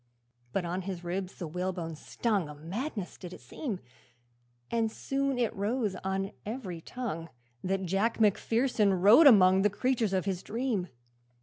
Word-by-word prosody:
But 180 +5 -1
on 180 +2 -2
his 185 -2 -5
ribs 185 +2 -3
the 175 - -5
whalebone 175 0 -3
stung, 200 +1 -1
A 150 - -8
madness 195 - -5
it 180 - -6
did 180 - -10
seem! 190 - -5 0.9
And 225 -1 +1
soon 275 +2 -1
it 240 -3 0
rose 210 +1 0
on 195 +1 -1
every 205 -7 -5
tongue 165 -8 -5 0.3
That 190 +1 -1
Jack 195 +7 0
Macpherson 220 0 +3
rode 210 - +8
among 190 -6 +7
The 210 - +4
creatures 230 -1 0
of 185 -1 +1
his 190 -2 -2
dream. 225 -5 -2
195 Hz, 150 wpm, -30 LUFS, 180-230 Hz, 0.9 s, rode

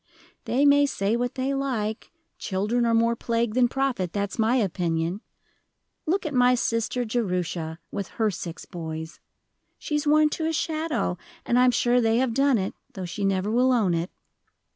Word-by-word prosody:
They 275 +4 +2
may 285 0 +5
say 200 -4 0
what 245 +1 -2
they 265 +1 -1
like 240 -6 -2 0.3
children 215 +5 0
are 230 - +2
more 230 +1 +3
plague 230 -1 -1
than 250 0 +4
profit, 250 -9 -1
that's 200 +1 -3
my 225 +3 +3
opinion. 175 -4 -1 0.9
Look 375 +4 0
at 305 - -3
my 250 0 +4
sister 235 +1 -1
Jerusha, 180 -8 -2
with 200 -3 -4
her 220 -2 +2
six 170 -2 -7
boys. 160 -1 -7 0.6
She's 300 -1 -2
worn 305 +1 +5
to 320 +1 -2
a 325 - -1
shadow, 310 - -1 0.3
and 240 - +2
I 250 - +6
am - - +6
sure 245 0 +2
they 225 0 +2
have 255 -2 +1
done 275 0 +3
it, 190 -1 -2 0.2
though 190 - -5
she 190 +4 -5
never 195 +1 0
will 250 +3 +3
own 215 -8 +2
it." 170 +2 -1
230 Hz, 175 wpm, -25 LUFS, 190-260 Hz, 0.9 s, I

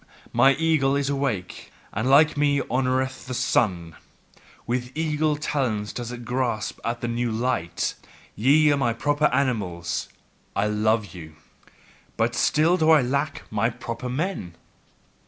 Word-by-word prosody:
Mine 135 0 +5
eagle 155 -4 +2
is 140 0 0
awake, 130 -10 -3 0.2
and 110 +6 -1
like 150 +3 +6
me 145 -1 +2
honoureth 130 +1 -1
the 125 - -4
sun. 85 -9 0 0.7
With 125 +1 -2
eagle 155 -1 +1
talons 125 -8 -2
doth 120 -1 -5
it 120 -1 -8
grasp 120 -3 -2
at 115 +1 -3
the 120 - -2
new 120 0 -1
light. 115 -6 -1 0.4
Ye 145 +6 +4
are 145 - +2
my 120 -4 +1
proper 145 +5 0
animals; 90 - -1 0.5
I 100 - +1
love 105 0 0
you. 80 -3 -10 0.8
But 115 +1 +1
still 155 +8 +3
do 160 -2 +2
I 155 -4 +6
lack 140 +4 -2
my 110 +2 +1
proper 120 +1 -6
men!" 130 - -3
125 Hz, 140 wpm, -24 LUFS, 110-145 Hz, 0.8 s, like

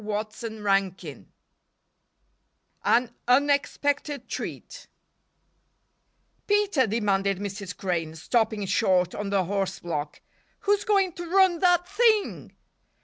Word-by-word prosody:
CHAPTER 210 -1 -1
XV - - -10 1.6
An 240 0 +2
Unexpected 285 +2 +1
Treat - - -7 1.6
"PETER," 405 - +2
demanded 200 -3 0
Mrs. 195 -1 -6
Crane, 165 -4 -2
stopping 215 +4 0
short 180 -1 +2
on 205 -1 -4
the 195 -1 +2
horse 195 0 -2
block, 150 -3 -5 0.4
"who's 410 0 +1
going 395 -3 +2
to 345 0 -7
run 375 -2 +4
that 355 -1 +3
thing?" 430 +1 +1
220 Hz, 95 wpm, -26 LUFS, -, 1.6 s, run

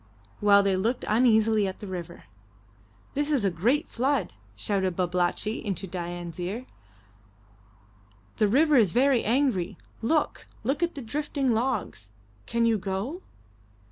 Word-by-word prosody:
while 200 -1 +6
they 195 -1 +2
looked 225 +7 -1
uneasily 220 -2 +3
at 190 - -5
the - - -7
river. 180 -3 -7 0.9
"This 290 +1 -1
is 275 -9 +1
a 195 - +2
great 240 - +1
flood!" 265 - 0 0.2
shouted 190 - -1
Babalatchi 180 +4 -1
into 195 -2 -3
Dain's 175 -2 -6
ear. 200 +8 -4 1.7
"The 215 - +3
river 290 +6 +4
is 210 -7 +4
very 255 0 +3
angry. 235 -7 +1 0.2
Look! 305 +7 0 0.2
Look 270 +7 -1
at 340 0 0
the 275 - -6
drifting 280 +1 -1
logs! 220 - -2 0.4
Can 235 0 +1
you 225 -2 +2
go?" 200 - -3
220 Hz, 135 wpm, -27 LUFS, 190-265 Hz, 1.7 s, while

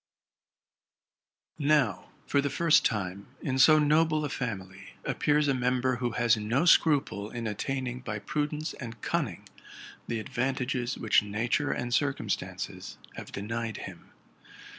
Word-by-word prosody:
Now, 140 - +2 0.2
for 140 - +2
the 140 - -1
first 165 +3 +4
time, 100 -3 -2 0.2
in 130 -1 -1
so 155 +3 +8
noble 155 +1 +3
a - - -3
family 95 -7 -5
appears 150 0 +2
a 140 - +3
member 125 0 +1
who 120 -1 -2
has 120 +1 +3
no 115 +7 0
seruple 140 -11 +3
in 120 -1 -5
attaining 125 +3 -3
by 110 -4 -4
prudence 150 +6 -2
and 115 -4 -8
cunning - - -2 0.6
the 115 - -2
advantages 130 +1 -2
which 110 - +3
nature 115 +8 -1
and 120 0 -2
circumstances 145 +1 -2 0.2
have - - -8
denied 115 +2 -4
him. - - -11
125 Hz, 130 wpm, -29 LUFS, 110-145 Hz, 0.6 s, so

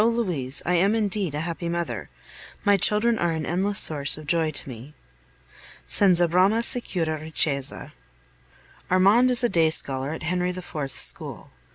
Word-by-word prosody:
Louise, 180 - -2
I 180 - 0
am 195 +5 +2
indeed 200 -7 -2
a 150 - -3
happy 170 +1 -5
mother. 170 -1 -4 0.6
My 205 0 +4
children 215 +4 +3
are 170 -1 0
an 160 -1 -4
endless 195 +4 -1
source 145 -2 0
of 155 - -11
joy 160 +1 0
to 145 - -6
me. 130 +3 -11 0.9
Senza 180 -3 +3
brama 190 +7 +2
sicura 170 -11 -2
ricchezza. 150 -3 -3 1.0
Armand 200 +7 +3
is 250 0 +2
a 240 - +2
day 165 -4 +2
scholar 135 -3 +1
at 160 - -7
Henry 180 +2 -2
IV.'s 175 -6 -6
school. - - +3
175 Hz, 155 wpm, -23 LUFS, 155-200 Hz, 1.0 s, My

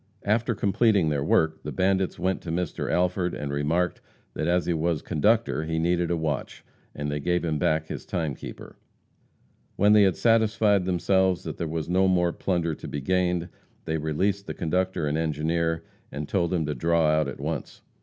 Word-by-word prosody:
After 115 +3 +1
completing 100 -3 +2
their 70 -2 0
work 80 +2 +2
the - - -5
bandits 95 0 +1
went 95 +1 -1
to 85 - -5
Mr. 90 -1 -2
Alford 90 0 0
and 70 -1 -4
remarked 80 +5 0 0.3
that 75 - -2
as 90 0 +2
he 85 - +1
was 80 -1 -1
conductor 95 0 +1
he 80 0 -2
needed 85 +1 +1
a 85 - 0
watch, 75 -3 -3 0.3
and 75 0 -3
they 75 - -2
gave 90 +4 0
him 75 -2 -1
back 80 +2 +1
his - - -6
timekeeper. 80 -6 -5 1.0
When 105 +2 +4
they 105 - +7
had 95 -4 +4
satisfied 110 -4 +3
themselves 95 0 +1
that - - -6
there 85 - -2
was 80 -1 -3
no 95 +2 +3
more 90 -2 +2
plunder 85 -4 -1
to - - -8
be 75 - -4
gained, 90 +2 0 0.4
they 80 0 -1
released 95 +7 -1
the - - -5
conductor 90 0 -1
and 75 +2 0
engineer, 80 +1 -1 0.3
and 75 +2 -5
told 85 -4 0
them 85 -3 0
to 75 - -2
draw 85 +5 +2
out 75 -1 +2
at 70 - -7
once. 75 +1 -5
85 Hz, 185 wpm, -26 LUFS, 80-95 Hz, 1.0 s, they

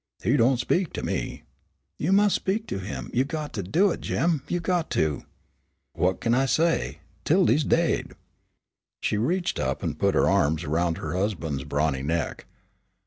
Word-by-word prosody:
"He 125 - +3
don't 125 0 +4
speak 175 +8 0
to - - -4
me." - - -3 0.6
"You 165 - 0
mus' 205 0 +4
speak 210 +4 -1
to - - -3
him; 95 +2 -6
you 125 - +3
got 150 +1 -5
to 105 - -2
do 175 - +2
it, - - -4
Jim; 165 -4 0
you 175 - -1
got 175 -1 0
to." 75 -2 0 0.7
"What 90 +3 0
kin 115 - +1
I 135 +2 +3
say? 165 +5 +1 0.3
'Tildy's 135 +8 +3
daid." 165 +2 +1 0.9
She - - 0
reached 175 - 0
up 65 +1 -2
and - - -3
put - - +2
her - - +4
arms 80 +3 +2
around 80 +2 0
her 75 - -4
husband's 85 -8 -2
brawny 70 -1 0
neck. 80 +3 -2
120 Hz, 170 wpm, -26 LUFS, -, 0.9 s, don't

